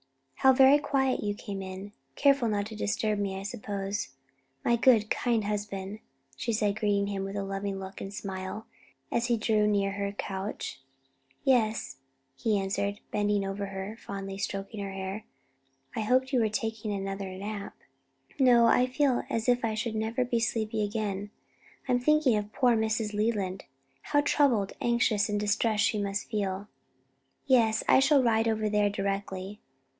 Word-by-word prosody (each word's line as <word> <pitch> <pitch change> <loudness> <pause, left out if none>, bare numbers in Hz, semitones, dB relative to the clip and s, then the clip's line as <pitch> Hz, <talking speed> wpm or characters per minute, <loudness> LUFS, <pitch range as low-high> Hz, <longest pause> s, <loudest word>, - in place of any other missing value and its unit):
"How 265 - +6
very 265 +2 +7
quietly 265 -6 0
you 205 - -1
came 200 -1 -6
in; 190 +2 -7 0.2
careful 275 -4 +4
not 205 -2 0
to 220 +1 -8
disturb 215 0 -1
me 195 -1 -2
I - - -7
suppose, 200 -2 -4 0.6
my 235 - +4
good, 230 -3 +4
kind 235 -3 +1
husband," 205 -1 -4 0.4
she 230 - -2
said 210 -1 0
greeting 205 -2 +2
him 200 -1 -3
with 195 +1 -5
a 200 - -2
loving 195 0 -3
look 190 0 -8
and 195 - -5
smile, 195 +1 -5 0.5
as 235 0 +1
he 240 -1 +2
drew 215 -1 +2
near 200 -1 +1
her 200 0 -2
couch. 195 -6 -5 0.6
"Yes," 220 - +1 0.4
he 210 +9 +1
answered, 200 +1 -2
bending 205 -1 +1
over 195 +1 -3
her 195 0 -5
and 225 +2 -10
fondly 195 -1 -6
stroking 195 +2 -4
her 195 - -5
hair. 195 +2 -5 0.7
"I - - -1
hoped 255 +5 +2
you 255 - +4
were 220 -2 +2
taking 220 0 -3
another 195 -1 -4
nap." 200 +1 -6 0.6
"No, 245 -3 +6
I 250 +2 +4
feel 260 -1 +2
as 225 +1 -1
if 245 -1 +3
I 220 -1 0
should 220 +1 -2
never 225 +3 -1
be 240 -1 0
sleepy 220 -1 -1
again. 205 -1 -2 0.6
I'm 250 -1 +3
thinking 305 -2 +3
of 210 0 -2
poor 245 0 +3
Mrs. 220 -1 0
Leland. 205 -3 -1 0.4
How 290 - +2
troubled, 260 -9 +2
anxious 235 -3 +2
and 205 0 0
distressed 210 +1 +1
she 230 -2 +1
must 200 0 -2
feel." 200 -1 -2 0.8
"Yes; 230 -5 +3
I - - +6
shall 275 0 +4
ride 225 -1 +3
over 220 -1 +1
there 210 -1 +2
directly." 195 0 -3
210 Hz, 165 wpm, -29 LUFS, 200-230 Hz, 0.8 s, very